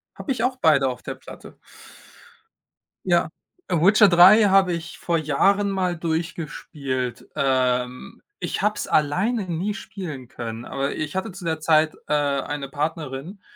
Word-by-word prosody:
Habe 285 - -5
ich 245 -3 -1
auch 255 +1 0
beide 150 - +3
auf 125 -1 -6
der 135 - -6
Platte. 130 - -13 1.5
Ja, - - +2 0.4
äh, 180 - 0
Witcher 200 +6 +6
3 190 +4 +7
habe 195 -2 +4
ich 170 0 -5
vor 170 -1 -1
Jahren 195 +7 +2
mal 185 -3 -1
durchgespielt. 155 -6 -4
Ähm, 125 +4 -1 0.2
ich - - -3
habe 210 0 +1
es - - -4
alleine 190 +10 +1
nie 185 +6 -2
spielen 165 - -8
können, 115 -1 -6
aber 135 +1 -3
ich 155 +1 -4
hatte 190 +3 -3
zu 190 0 -10
der 160 -2 -2
Zeit, 155 0 +3
äh, 150 - -1
eine 140 -1 -1
Partnerin, 150 +4 -4
160 Hz, 150 wpm, -23 LUFS, 140-190 Hz, 1.5 s, 3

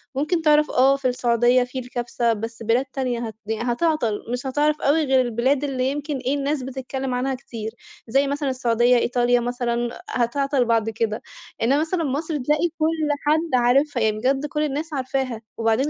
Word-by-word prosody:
ممكن 315 +5 0
تعرف 300 -1 +4
آه 270 +2 +4
في 275 -2 -1
السعودية 245 0 +3
في 250 +1 -5
الكبسة 240 -1 -1
بس 225 +1 -6
بلاد 235 +4 +2
تانية 260 -3 -3
هت 220 - -8 0.3
هتعطل، 245 -3 0
مش 250 +2 -3
هتعرف 295 +3 +1
أوي 305 +3 +3
غير 265 -1 +4
البلاد 255 +4 +1
اللي 265 -1 0
يمكن 290 0 -3
إيه 260 +2 -1
الناس 285 -1 -1
بتتكلم 265 0 -4
عنها 260 +1 -1
كتير، 230 -4 -7 0.4
زي 275 +4 +2
مثلًا 285 0 -1
السعودية، 245 -1 +2
إيطاليا 245 0 +2
مثلًا، 240 0 -2
هتعطل 260 +2 +1
بعد 225 -1 +1
كده، 220 0 -2 0.4
إنما 270 +6 +3
مثلًا 330 +1 -1
مصر 300 +2 -2
تلاقي 300 +6 +1
كُلّ 315 -1 +1 0.2
حد 310 -4 +2
عارفها، 260 +1 +2
يعني 215 -1 +1
بجد 270 +5 0
كُلّ 300 +1 -2
الناس 300 +2 -3
عارفاها، 260 -3 -2 0.2
وبعدين 225 +5 +1
260 Hz, 170 wpm, -23 LUFS, 240-285 Hz, 0.4 s, تعرف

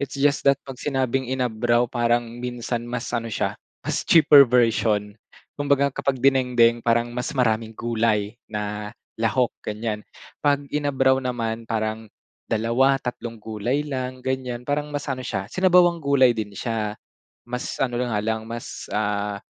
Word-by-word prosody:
It's 140 -1 -4
just 140 0 +2
that 140 - +5
'pag 135 -2 -9
sinabing 130 -2 -1
inabraw, 120 -2 +1
parang 120 0 0
minsan 120 -1 -4
mas 125 0 -4
ano 115 -1 -1
siya, 110 - -2 0.2
mas - - -1
cheaper 145 -5 +7
version. 110 -4 +2 0.5
Kumbaga, 140 -1 +2
kapag 135 0 -1
dinengdeng 125 -3 +4
parang 120 +1 +1
mas 125 0 -3
maraming 110 -2 0
gulay 110 -3 0 0.2
na 105 +1 -5 0.2
lahok, 115 +2 +2
ganiyan. 105 0 -3 0.4
'Pag 145 -1 +2
inabraw 135 -2 +2
naman 115 -3 -3
parang 110 0 -2 0.4
dalawa, 115 +5 +2
tatlong 120 -3 -5
gulay 110 +6 -2
lang, 130 -3 -5
ganiyan. 125 -2 -3
Parang 145 +2 -1
mas 145 -1 -4
ano 130 -3 -3
siya, 100 -6 -3
sinabawang 180 -2 +4
gulay 140 -4 +4
din 105 -3 -5
siya. 110 -3 -2 0.5
Mas 125 +1 -4
ano 125 -2 -1
na 120 -3 -1
nga - - +1
lang, 110 0 -1
mas, 115 0 -7
ah, 105 -1 -1
120 Hz, 150 wpm, -23 LUFS, 110-135 Hz, 0.5 s, cheaper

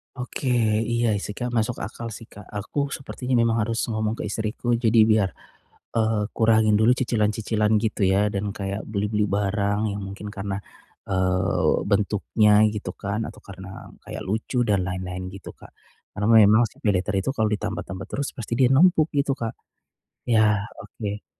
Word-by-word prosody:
Oke. 125 +1 -6 0.5
Iya 115 -3 +2
sih, 100 +1 -5
Kak, 120 +3 -3
masuk 120 0 -1
akal 115 -1 -6
sih, 110 +2 -11
Kak. 105 -1 -13
Aku 140 +9 -3
sepertinya 130 -2 -5
memang 115 0 +2
harus 115 0 -1
ngomong 110 -1 -1
ke - - -6
istriku 110 +3 -1
jadi 115 -1 +3
biar, 110 -3 +3 0.7
eee, 110 -1 +2
kurangin 110 -1 +4
dulu 110 +2 +5
cicilan-cicilan 110 -3 0
gitu 110 -2 -2
ya, 105 +2 +3
dan 100 0 -2
kayak 100 0 -4
beli-beli 105 0 0
barang 100 +1 0
yang 100 0 -4
mungkin 100 +2 -7
karena, 100 -1 -4 0.5
eee, 95 0 +1
bentuknya 105 +1 +3
gitu 105 -1 -5
kan, 105 +2 -3
atau - - -14
karena 95 -1 -10 0.2
kayak - - -6
lucu 110 +5 -1
dan 100 -4 +1
lain-lain 90 0 -4
gitu, 95 - -9
Kak. - - -16 0.4
Karena 105 +1 -1 0.2
memang 110 +3 +4
si - - -24
PayLater 100 -1 +1
itu 95 - -1
kalau 110 -5 +1
ditambah-tambah 105 -3 -4
terus, 140 0 -2
pasti 115 -1 -4
dia 130 -2 +5
numpuk 160 +3 +5
gitu, 140 0 +2
Kak. 115 -4 -4 0.8
Iya, 110 -3 +4 0.2
oke. 105 -1 -6
105 Hz, 160 wpm, -24 LUFS, 100-115 Hz, 0.8 s, dulu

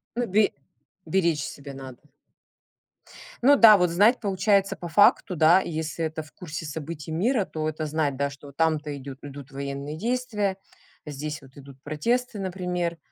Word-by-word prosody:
Ну, 245 0 0
бе 205 +2 +3 0.6
беречь 165 -3 +1
себя 140 -1 -8
надо. 130 -2 -10 1.4
Ну 280 +4 +6
да, 225 -5 +9
вот 180 -2 +2
знать, 205 +9 +4
получается 195 -1 +1
по 175 - -7
факту, 200 0 +4
да, 165 +5 +6
если 160 -1 -4
это 160 0 -3
в 155 - -18
курсе 160 -2 -7
событий 155 +1 -6
мира, 210 +6 +1
то 155 -2 -3
это 155 0 -4
знать, 150 -3 -1
да, 140 +1 0
что 140 +1 -13
вот 140 - -15
там-то 155 -2 0
идут 135 0 -9
идут 140 -1 -9
военные 140 +2 -5
действия, 215 -2 -1 0.5
здесь 150 0 -5
вот 135 -1 -18
идут 140 -1 -14
протесты, 225 - -1
например, 180 -2 -2
160 Hz, 160 wpm, -25 LUFS, 145-195 Hz, 1.4 s, да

